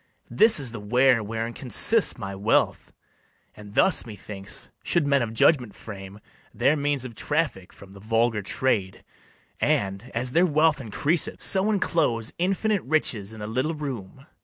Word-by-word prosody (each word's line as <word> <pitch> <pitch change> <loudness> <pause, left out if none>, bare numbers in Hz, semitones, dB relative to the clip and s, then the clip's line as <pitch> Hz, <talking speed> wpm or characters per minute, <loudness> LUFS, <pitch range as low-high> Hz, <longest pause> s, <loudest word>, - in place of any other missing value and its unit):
This 220 -5 +5
is 135 -5 +1
the 115 - -8
ware 125 +3 +2
wherein 115 +2 -5
consists 190 - +5
my 100 -1 -6
wealth; 100 +4 0 0.6
And 105 -1 -13
thus 190 - +3
methinks 100 -3 -8
should 170 -4 0
men 140 -1 +2
of 115 -2 -3
judgment 120 0 +1
frame 100 -1 -11 0.4
Their 145 - +2
means 145 -3 -1
of 125 - -8
traffic 145 - -3
from 100 -1 -16
the 100 - -14
vulgar 115 +1 0
trade, 100 -2 -2 0.6
And, 100 +4 -1
as 125 +2 -2
their 175 +6 +3
wealth 155 -2 +1
increaseth, 145 - -2
so 195 +2 +4
inclose 155 - -1
Infinite 195 +2 0
riches 125 -8 0
in 110 -1 -10
a - - -4
little 130 +9 -2
room. 135 -4 -8
120 Hz, 155 wpm, -24 LUFS, 105-150 Hz, 0.6 s, This